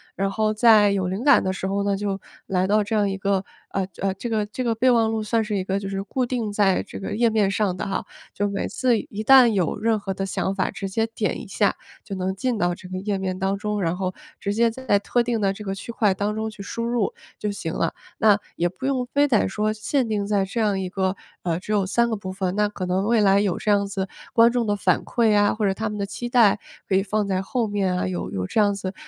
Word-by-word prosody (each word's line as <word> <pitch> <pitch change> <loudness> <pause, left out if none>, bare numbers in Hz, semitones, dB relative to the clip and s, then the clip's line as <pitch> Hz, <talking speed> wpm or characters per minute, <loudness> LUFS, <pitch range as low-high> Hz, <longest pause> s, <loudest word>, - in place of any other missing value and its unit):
然 195 0 0
后 215 +1 0
在 215 -2 +6
有 190 -2 0
灵 190 +6 -3
感 285 0 +6
的 190 - 0
时 190 - -5
候 200 +1 0
呢， 200 -1 0
就 195 -1 -2 0.3
来 185 0 0
到 210 +1 +3
这 215 +2 -2
样 205 -2 +2
一 195 - -3
个， 195 0 0 0.3
呃 195 - -1 0.2
呃 195 0 0
这 235 +5 -6
个 215 -2 0
这 235 +5 -5
个 230 -2 0
备 255 +3 +3
忘 230 -2 +3
录 220 -1 -1
算 225 +1 +1
是 210 -1 -2
一 185 - -1
个 195 +1 -1
就 195 -1 -5
是 195 0 -3
固 255 +5 -2
定 235 -4 -2
在 200 -3 +2
这 - - -9
个 205 +1 -4
页 230 0 +3
面 210 -3 +2
上 195 -2 0
的 - - -4
哈， 195 - -2 0.3
就 205 - -1
每 200 -1 -2
次 250 -3 +1
一 215 +1 -6
旦 260 +1 +8
有 195 -7 +1
任 225 +1 +2
何 195 -1 -4
的 195 - -4
想 190 0 -1
法， 190 -1 0
直 195 -1 -5
接 225 +4 0
点 225 +1 -2
一 235 - -10
下 200 +1 +1 0.3
就 195 - -6
能 190 0 -2
进 240 +1 -1
到 175 0 +1
这 180 - -12
个 185 0 -5
页 200 0 -1
面 185 -1 -3
当 195 +1 0
中， 210 0 -2
然 170 +1 0
后 185 -1 -2 0.3
直 200 - -2
接 230 +2 +3
在 230 -4 0
特 240 +4 +1
定 235 -2 -1
的 195 -1 +2
这 210 +2 -7
个 195 - -3
区 195 +4 -7
块 210 -4 +2
当 205 +2 -2
中 220 0 -2
去 205 - -11
输 230 +3 -4
入 235 -3 0 0.3
就 210 - -2
行 165 -5 -4
了。 - - -1 0.2
那 210 -2 +5 0.2
也 175 +1 +1
不 260 +9 -8
用 260 -2 0
非 290 0 +5
得 225 -7 +2
说 215 +2 0
限 230 +4 -1
定 205 -2 -1
在 200 -2 +1
这 225 +4 -2
样 205 -3 +1
一 185 -1 -3
个， 190 0 -1 0.3
呃 170 -1 -1
只 210 - -7
有 200 -3 +2
3 235 +4 +2
个 - - +1
部 185 -2 -6
分， 190 0 -2
那 210 0 +2
可 190 -3 -5
能 185 +2 0
未 235 -1 +3
来 200 -1 +5
有 195 -4 0
这 210 - 0
样 200 -1 +2
子 195 -1 -3 0.2
观 230 0 +5
众 240 -2 0
的 205 - +2
反 185 -3 +1
馈 230 -3 +2
啊， 205 0 +3
或 215 -1 -1
者 195 - +2
他 220 +2 -3
们 210 - -5
的 200 - -1
期 240 +4 -5
待 225 -5 +5 0.3
可 190 - +1
以 195 - +4
放 210 +1 -1
在 190 -1 0
后 235 +4 -1
面 195 -3 0
啊， 180 - -1
有 180 -1 -3
有 95 -1 -3
这 215 - +1
样 205 -1 +2
子， 190 0 -5
205 Hz, 295 characters per minute, -23 LUFS, 195-220 Hz, 0.3 s, 旦